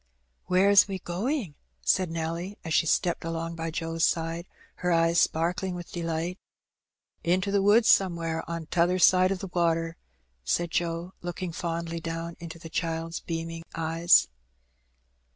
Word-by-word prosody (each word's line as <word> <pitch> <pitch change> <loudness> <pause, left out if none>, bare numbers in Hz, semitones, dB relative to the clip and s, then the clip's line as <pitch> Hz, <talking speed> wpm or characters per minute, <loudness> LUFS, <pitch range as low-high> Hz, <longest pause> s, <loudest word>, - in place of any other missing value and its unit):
"Where 185 +2 +4
is 200 - +7
'we 195 -1 -3
going?" 195 - -2 0.3
said 185 -2 +2
Nelly^ 170 +4 -4
as 160 - -2
she 160 - +3
stepped 175 +2 +1
along 165 0 -3
by 165 0 -3
Joe's 165 0 -3
side, 165 +2 0 0.3
her 180 0 -1
eyes 165 0 +3
sparkling 180 +3 0
with 175 -1 -8
delight. 170 +1 -3 0.8
"Into 185 +3 +1
the 200 0 +3
woods 210 +3 +5
somewhere 165 -3 +2
on 165 -1 -4
t'other 175 +2 +2
side 185 +1 +5
o' - - +1
the 185 0 -7
water," 165 -1 +1 0.5
said 170 - 0
Joe, 170 +2 -2
looking 175 0 -4
fondly 170 0 -3
down 165 0 -5
into 170 -1 -8
the 165 - -10
child's 165 0 -3
beaming 165 0 -5
eyes. 165 +2 +4
170 Hz, 150 wpm, -27 LUFS, 165-180 Hz, 0.8 s, is